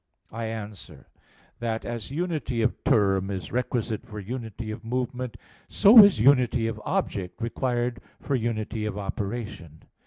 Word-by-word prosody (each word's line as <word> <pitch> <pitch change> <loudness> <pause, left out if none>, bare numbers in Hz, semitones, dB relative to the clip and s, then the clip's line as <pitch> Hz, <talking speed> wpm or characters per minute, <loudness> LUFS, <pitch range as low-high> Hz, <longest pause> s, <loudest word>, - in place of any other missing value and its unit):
I 115 +1 -4
answer 110 -3 -8 0.5
that, 115 -1 -2
As 120 -3 -5
unity 150 -6 -2
of - - -1
term 95 -2 +2
is 95 -2 -5
requisite 120 -2 -1
for 105 -3 -9
unity 110 0 -6
of 110 +1 -7
movement, 125 +1 -3 0.3
so 215 +2 +9
is 200 - +5
unity 125 -1 +4
of 115 -1 -3
object 95 -3 -2
required 120 0 -1 0.2
for 140 - -3
unity 110 -3 -1
of 105 -1 -4
operation. 100 -5 -5
115 Hz, 135 wpm, -26 LUFS, 105-125 Hz, 0.5 s, so